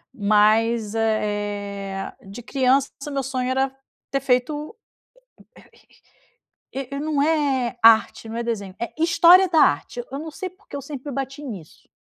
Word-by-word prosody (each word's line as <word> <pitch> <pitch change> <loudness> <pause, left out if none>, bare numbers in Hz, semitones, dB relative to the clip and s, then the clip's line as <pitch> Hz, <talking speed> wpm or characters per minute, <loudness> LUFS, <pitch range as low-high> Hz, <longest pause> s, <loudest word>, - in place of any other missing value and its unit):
mas, 215 +1 +2
eh, 205 -3 -2
de 200 +5 -9
criança 265 +2 +2 0.2
o - - -5
meu 275 -1 -2
sonho 255 -1 -2
era 265 +1 0 0.4
ter 275 - 0
feito 275 - -1 2.0
e 265 -1 -5
e, 280 - -4
não 300 -1 0
é 280 -6 +1
arte, 225 0 +5
não 225 - -5
é 235 - -2
desenho, 205 -5 -4
é 235 - -4
história 340 +3 +6
da 325 -2 +3
arte, 145 - +1
eu 275 - -4
não 320 +1 -6
sei 370 +5 -6
porque 370 -3 -14
eu 280 - -4
sempre 285 0 -7
bati 275 +2 -5
nisso. 195 - -10
255 Hz, 150 wpm, -23 LUFS, 215-285 Hz, 2.0 s, história